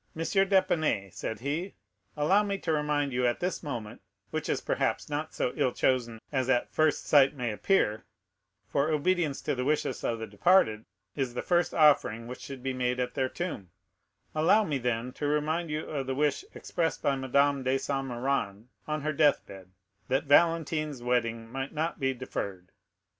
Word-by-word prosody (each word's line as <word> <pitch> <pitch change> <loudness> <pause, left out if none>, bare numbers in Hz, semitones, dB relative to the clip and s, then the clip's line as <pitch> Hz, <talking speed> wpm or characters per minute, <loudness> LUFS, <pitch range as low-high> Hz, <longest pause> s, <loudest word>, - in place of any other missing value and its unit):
d'Épinay," 165 - +1
said 105 +3 -5
he, 155 +8 -3 0.4
"allow 185 +8 +4
me 200 -1 -2
to 165 -4 -2
remind 150 -2 0
you 125 0 +2
at 120 - 0
this 180 +1 -2
moment,—which 120 -9 -7
is - - +1
perhaps - - -1
not 150 +2 -2
so 125 - -1
ill 125 - +1
chosen 120 -3 0
as 130 -3 0
at 125 -2 +1
first 155 -1 +2
sight 140 -1 +5
may 125 -4 -2
appear, 110 - +1 0.6
for 140 +3 +1
obedience 155 -1 +1
to - - 0
the 125 -1 -2
wishes 150 +3 -1
of 115 - 0
the 115 - -5
departed 110 - +3 0.3
is 130 -4 -2
the - - -3
first 175 -1 +2
offering 140 -7 +4
which 125 +1 -7
should 135 -2 -8
be 135 0 -1
made 125 0 -1
at 125 0 -2
their 130 -1 0
tomb,—allow 160 - -2
me 150 -8 -1
then 125 0 -2
to 145 - -3
remind 155 +3 0
you 150 +1 -3
of 140 -3 -4
the 130 - -1
wish 150 - +1
expressed 165 -2 -2
by 140 - +2
Madame 140 +1 +2
de 130 +1 +1
Saint 135 0 -2
Méran 120 -5 -2 0.2
on 155 0 -2
her 155 +1 -1
death 150 -1 +3
bed, 95 -2 -12 0.4
that 130 +1 +1
Valentine's 155 -2 +2
wedding 115 -2 0
might 135 +1 -4
not 160 +2 -2
be 135 -1 +1
deferred. 100 -8 -6
140 Hz, 175 wpm, -29 LUFS, 125-155 Hz, 0.6 s, sight